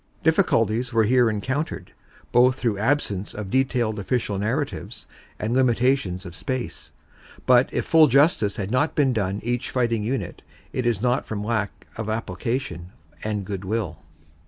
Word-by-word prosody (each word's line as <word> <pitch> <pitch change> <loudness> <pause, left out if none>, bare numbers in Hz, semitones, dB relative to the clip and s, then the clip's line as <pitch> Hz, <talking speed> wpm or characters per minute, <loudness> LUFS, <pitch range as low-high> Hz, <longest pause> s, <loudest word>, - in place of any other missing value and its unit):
Difficulties 125 - +2
were 115 -1 +3
here 120 +1 +4
encountered, 110 - -3 0.4
both 125 +1 +5
through 115 -6 -1
absence 105 -5 0
of 105 -3 -6
detailed 125 -5 +1
official 100 -1 -1
narratives 130 +8 -3 0.3
and 110 +2 -2
limitations 125 -6 +2
of 85 -2 -8
space, 130 +4 -5 0.5
but 125 0 +5
if - - -1
full 160 -1 +6
justice 135 - +3
has 100 +1 -4
not 130 +5 +1
been 135 -4 +3
done 100 -3 -1
each 120 +2 -2
fighting 115 -4 0
unit, 110 -5 -3 0.3
it 125 -2 -1
is 115 -2 0
not 125 +2 +1
from 105 -2 -4
lack 105 -2 -2
of 110 -1 -4
application 110 -3 -3 0.3
and 105 -2 -2
goodwill. 100 0 -3
115 Hz, 145 wpm, -24 LUFS, 105-130 Hz, 0.5 s, full